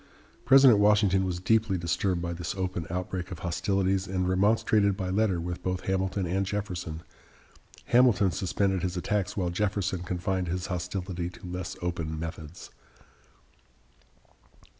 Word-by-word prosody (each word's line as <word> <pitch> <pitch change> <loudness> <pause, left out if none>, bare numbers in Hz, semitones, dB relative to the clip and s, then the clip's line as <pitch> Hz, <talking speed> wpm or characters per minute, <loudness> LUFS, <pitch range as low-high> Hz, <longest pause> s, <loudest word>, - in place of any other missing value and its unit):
President 135 -3 +7
Washington 105 -2 +4
was 90 -1 -2
deeply 110 0 +2
disturbed 85 +1 -1
by 85 0 -2
this 85 0 -4
open 95 -3 -3
outbreak 90 +1 -4
of 90 - -6
hostilities, 95 +2 0
and 90 -1 -1
remonstrated 100 +1 +2
by 95 -2 -3
letter 100 -3 +1
with 85 +1 -5
both 90 0 -2
Hamilton 95 0 -1
and 95 +3 0
Jefferson. 90 -5 -4 0.8
Hamilton 120 -6 +4
suspended 95 +1 0
his 90 +1 -2
attacks, 100 +2 -1
while 90 -3 0
Jefferson 95 -1 -1
confined 90 +1 -2
his 90 +1 -2
hostility 90 -1 -3
to 90 - -13
less 90 -1 -5
open 80 -3 -3
methods. 80 0 -7
95 Hz, 135 wpm, -28 LUFS, 90-100 Hz, 0.8 s, President